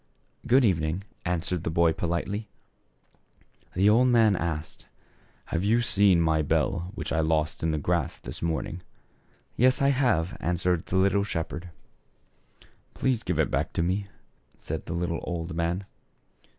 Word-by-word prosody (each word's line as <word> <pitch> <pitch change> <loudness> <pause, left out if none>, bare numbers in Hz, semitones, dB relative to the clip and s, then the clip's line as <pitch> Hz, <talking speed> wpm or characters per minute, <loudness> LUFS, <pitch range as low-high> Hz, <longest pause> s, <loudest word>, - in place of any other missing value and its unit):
" - - -18
Good 130 +1 +5
evening," 85 -1 0 0.2
answered 90 -1 -1
the - - -1
boy 85 0 +3
politely. 90 +6 -3 1.3
The 95 +3 +3
old 115 +4 +5
man 115 -4 +4
asked, 80 -3 -4 0.7
"Have 85 +2 0
you 115 +4 +3
found 100 -6 +4
my 80 -1 +2
bfell 85 +4 0
which - - -4
I 80 - +1
lost 80 -1 0
in 80 - 0
the 80 - 0
grass 85 +3 -1
this - - -7
morning? 85 +1 -2 0.3
" - - -38
" - - -39
Yes, 130 +2 +4
I 140 - +3
have," 120 - +1
answered 90 +1 0
the - - -3
little 100 +1 +3
shepherd. 85 -2 -4 1.3
"Please 130 -4 0
give 90 -7 -2
it 80 - +1
back - - -1
to 85 - 0
me," 95 +3 -1 0.5
said 80 0 -6
the 85 - -3
little 85 -1 -2
old 85 -1 -4
man. 85 +3 -1
90 Hz, 160 wpm, -27 LUFS, 80-100 Hz, 1.3 s, Good